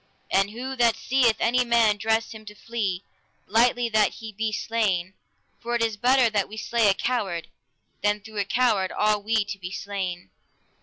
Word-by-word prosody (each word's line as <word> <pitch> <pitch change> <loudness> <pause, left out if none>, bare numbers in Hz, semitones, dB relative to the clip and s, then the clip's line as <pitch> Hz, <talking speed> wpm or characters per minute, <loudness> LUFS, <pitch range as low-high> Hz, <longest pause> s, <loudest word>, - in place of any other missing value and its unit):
And 195 +1 +3
who 255 +5 -6
that 235 -2 +4
seeth 245 -1 +2
any 250 +2 +2
man 230 -3 +3
dress 220 +2 0
him 220 -1 -10
to 210 0 -10
flee, 205 -5 -3 0.4
lightly 240 +3 +2
that 215 -2 +2
he 220 -1 -9
be 215 +1 -2
slain, 200 -5 -1 0.5
for 240 0 -3
it 235 - +1
is 225 -2 0
better 250 +3 +4
that 205 -3 -1
we 215 - -9
slay 225 0 +1
a 195 - +3
coward, 195 -10 -2 0.5
than 205 +1 +1
through 215 0 -8
a 200 - 0
coward 215 -4 +1
all 210 0 +1
we 220 0 +1
to 200 -1 -6
be 180 -1 -6
slain. 190 -2 -5
220 Hz, 185 wpm, -25 LUFS, 200-235 Hz, 0.5 s, that